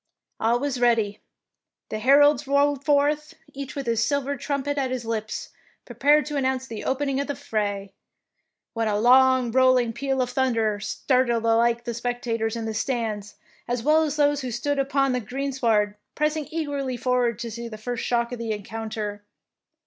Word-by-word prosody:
All 235 +2 +2
was 275 -2 -2
ready; 225 -4 +2 0.7
the 215 - -3
heralds 290 +4 +5
rode 280 0 +2
forth, 295 +1 +1 0.2
each 275 -1 -7
with 275 -1 -4
his 230 -1 +1
silver 285 +2 0
trumpet 280 +1 -2
at 265 -1 0
his 255 -2 -4
lips 220 -1 -4 0.4
prepared 295 0 +3
to 295 -1 -3
announce 260 -1 0
the 225 -4 -7
opening 275 0 0
of 280 - -2
the 285 - -3
fray, 205 -7 -3 0.8
when 225 -1 -1
a 205 -1 +1
long 255 +1 +5
rolling 255 -2 +4
peal 270 +2 -2
of 245 - -5
thunder 230 -5 +1
startled 235 +2 0
alike 230 +1 +3
the 235 -1 -4
spectators 235 -1 -2
in 230 -1 -4
the 220 - -3
stands 220 -3 -3 0.3
as 240 -1 -2
well 310 +3 +4
as 305 -2 -1
those 290 -1 +2
who 255 - -4
stood 275 +5 -1
upon 275 0 +1
the 250 - 0
greensward 235 -4 0 0.2
pressing 305 0 0
eagerly 285 -5 -3
forward 245 -2 +1
to 235 -1 -5
see 235 +2 -6
the 215 -2 -8
flrst 240 +2 -4
shock 235 0 0
of 245 - -5
the 230 -1 -3
encounter. 210 0 -5
250 Hz, 170 wpm, -24 LUFS, 225-280 Hz, 0.8 s, heralds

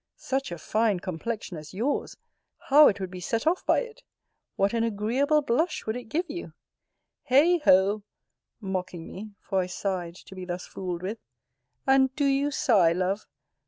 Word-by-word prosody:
Such 270 -5 -2
a 175 - -4
fine 215 +3 +1
complexion 185 +1 -5
as 155 +3 -10
yours, 250 +8 -1 0.4
how 295 +2 +6
it 200 - +1
would 190 -2 -4
be 185 - -7
set 225 +5 -2
off 340 +4 +2
by - - +4
it! 475 0 -9 0.5
What 200 +2 +1
an 230 -1 +1
agreeable 240 +8 +1
blush 305 +7 0
would 220 - -2
it 245 -1 -6
give 335 +11 -2
you! 345 +4 -7 0.8
Heigh 320 +7 +5
ho! 195 -1 +4 0.6
(mocking 185 -4 -4
me, 205 +2 -9
for 195 - -1
I 180 - 0
sighed 180 -2 -3
to 190 - -13
be 185 -1 -7
thus 180 0 -5
fooled 180 -2 -5
with,) 210 +4 -4 0.7
and 270 -1 +4
do 290 - +1
you 275 +1 +2
sigh, 200 - +3
love? 185 +3 -1
215 Hz, 170 wpm, -27 LUFS, 185-275 Hz, 0.8 s, how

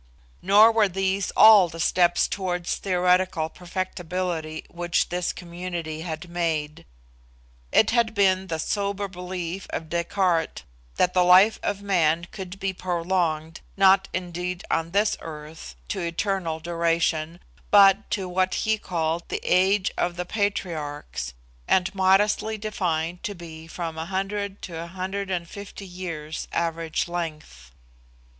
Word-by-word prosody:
Nor 210 +4 +7
were 220 -2 +4
these 190 +1 -1
all 210 -5 +8
the 165 0 -9
steps 175 +1 +3
towards 180 -3 -2
theoretical 180 -3 +1
perfectibility 175 -2 -4
which 175 0 -1
this 180 0 -1
community 170 -3 -6
had 165 0 -5
made. 160 - -2 0.8
It 220 - +4
had 230 -2 +2
been 190 -1 +3
the 160 - -2
sober 200 +4 -2
belief 180 0 -5
of 160 - -5
Descartes 170 -1 0 0.3
that 180 - +2
the 180 - +4
life 185 +5 +6
of 200 0 -2
man 170 -4 +2
could 190 -1 -8
be 195 0 -1
prolonged, 170 -3 -1 0.2
not, 195 0 +5
indeed, 180 0 -4
on 165 0 0
this 205 +4 +1
earth, 150 - -9
to - - -2
eternal 170 -1 -2
duration, 170 -1 0 0.3
but 200 0 +6
to 190 -2 -2
what 185 +1 0
he 220 0 0
called 165 -2 -2
the - - -3
age 190 +2 +3
of 175 0 0
the 180 0 -3
patriarchs, 155 - -3 0.3
and 185 +1 +2
modestly 205 +3 +2
defined 175 -5 -2
to 205 - -4
be 160 -2 -10
from 165 -1 -5
100 195 +4 -3
to 175 - -7
150 190 +2 -5
years 170 -4 -6
average 165 0 -1
length. 155 - -6
180 Hz, 125 wpm, -25 LUFS, 165-195 Hz, 0.8 s, all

